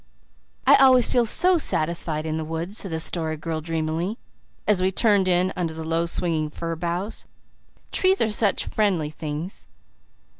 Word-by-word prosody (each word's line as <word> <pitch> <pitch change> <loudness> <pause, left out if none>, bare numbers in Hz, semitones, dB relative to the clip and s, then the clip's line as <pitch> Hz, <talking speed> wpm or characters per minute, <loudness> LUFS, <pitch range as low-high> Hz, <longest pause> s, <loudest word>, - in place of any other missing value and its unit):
"I - - +7
always 260 -3 +6
feel 240 -2 +3
so 360 +9 +5
SATISFIED 165 - -1
in 160 0 -2
the 160 - -3
woods," 165 +6 -4
said 195 - -2
the 160 -1 -3
Story 160 -1 -1
Girl 160 0 -4
dreamily, 165 +5 -3 0.5
as 205 -3 +3
we 185 - +2
turned 200 -1 +2
in 180 +1 +2
under 165 -3 -3
the 160 - -6
low 165 +1 -1
swinging 165 -3 -1
fir 165 +2 -5
boughs. 175 +6 -4 0.6
"Trees 380 +1 +3
seem 220 - 0
such 210 -2 +1
friendly 185 -8 -1
things." 155 +4 -7
170 Hz, 160 wpm, -23 LUFS, 160-205 Hz, 0.6 s, I